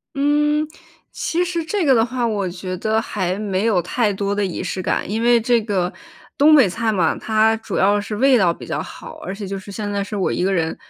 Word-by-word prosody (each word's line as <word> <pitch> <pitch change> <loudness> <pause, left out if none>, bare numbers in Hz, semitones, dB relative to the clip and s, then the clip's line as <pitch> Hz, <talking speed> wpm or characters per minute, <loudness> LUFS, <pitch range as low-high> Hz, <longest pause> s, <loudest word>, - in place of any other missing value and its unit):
嗯， 295 +2 +2 0.4
其 350 +2 -1
实 340 -2 -2
这 360 +2 -1
个 270 - +5
的 225 -2 +4
话， 245 0 -2
我 205 -5 -1
觉 185 +1 -5
得 220 +3 0
还 185 -4 -2
没 200 0 -1
有 205 -6 +3
太 210 +4 0
多 200 +1 -2
的 205 0 0
仪 180 -2 -3
式 185 0 -3
感。 185 - -1
因 220 +2 -1
为 240 0 +4
这 235 0 +2
个， 190 -4 -1 0.4
东 305 +1 +6
北 260 -9 +6
菜 225 +4 -1
嘛， 180 -6 +1
它 220 0 +2
主 220 - -6
要 205 +1 +3
是 210 0 -5
味 265 +4 +4
道 180 -5 +3
比 - - -9
较 - - -3
好， - - -10
而 190 - -5
且 200 0 -6
就 195 0 -4
是 200 +1 -11
现 205 0 -4
在 200 -1 -1
是 210 +1 -6
我 190 - 0
一 - - -1
个 195 - +1
人 165 -3 0
210 Hz, 260 characters per minute, -20 LUFS, 190-240 Hz, 0.4 s, 东